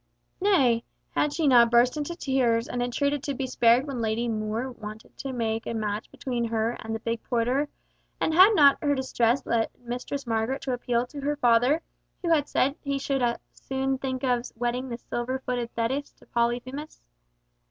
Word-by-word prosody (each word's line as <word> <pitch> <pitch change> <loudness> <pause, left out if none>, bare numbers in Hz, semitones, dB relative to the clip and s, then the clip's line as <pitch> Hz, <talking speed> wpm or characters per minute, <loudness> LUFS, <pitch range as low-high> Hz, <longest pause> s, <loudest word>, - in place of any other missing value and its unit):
Nay, 265 - +3 0.3
had 295 - +1
she 310 0 0
not 240 -3 +7
burst 240 +3 +4
into 300 +3 -3
tears 250 -7 +1
and 245 - -3
entreated 280 +3 0
to 280 0 -3
be 265 - -2
spared 245 0 +4
when 270 -5 -4
Lady 225 +2 0
More 220 +3 -2
wanted 215 -2 -10
to 270 - -4
make 225 -2 -2
a 230 - -2
match 210 -1 -3
between 245 -3 -3
her 225 0 0
and 225 0 -4
the - - -4
big 230 0 -3
porter, 250 +4 0 0.5
and 320 - +1
had 380 +6 +7
not 285 -4 +6
her 285 -1 +2
distress 260 -1 +1
led 230 -1 +1
Mistress 250 +3 -5
Margaret 230 +4 -1
to 260 - -1
appeal 245 0 0
to 285 +3 -9
her 295 +2 0
father, 250 +4 +3 0.4
who 340 - +1
had 295 -3 +3
said 275 +3 +1
he 280 -1 -1
should 275 -1 -1
as 240 -1 +1 0.2
soon 265 0 -2
think 260 -1 -3
of 245 -1 0
wedding 245 +2 -2
the 235 - -4
silver 240 +2 -3
footed 245 -2 -3
Thetis 260 +5 -1
to - - -22
Polyphemus. 245 +5 -2
250 Hz, 185 wpm, -26 LUFS, 235-275 Hz, 0.5 s, not